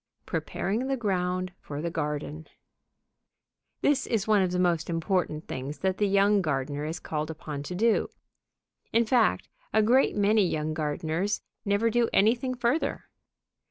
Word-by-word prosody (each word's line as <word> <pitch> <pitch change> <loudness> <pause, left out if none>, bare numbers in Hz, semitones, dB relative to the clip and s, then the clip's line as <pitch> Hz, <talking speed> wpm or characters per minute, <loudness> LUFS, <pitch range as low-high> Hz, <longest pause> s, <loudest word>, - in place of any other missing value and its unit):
Preparing 225 +7 -2
the 270 0 0
Ground 185 -4 -1
for 145 0 -7
the 170 +2 -2
Garden 150 0 -4 1.3
This 285 -3 +2
is 220 -3 0
one 210 -2 +4
of 185 - +2
the 180 - -1
most 175 -3 +1
important 165 -2 -1
things 135 +3 -5
that 190 0 0
the 205 - +3
young 200 +1 +4
gardener 145 -2 -2
is 160 +3 -4
called 155 0 -3
upon 150 -2 -6
to 160 +5 -6
do. 225 +4 +2 0.8
In 230 +1 +3
fact, 235 0 +2 0.2
a 220 - +4
great 250 +5 +4
many 210 +1 +4
young 155 -3 -1
gardeners 160 +6 -1 0.2
never 205 +3 +2
do 235 0 +2
anything 245 +5 +3
further. 245 +6 0
185 Hz, 150 wpm, -27 LUFS, 155-220 Hz, 1.3 s, one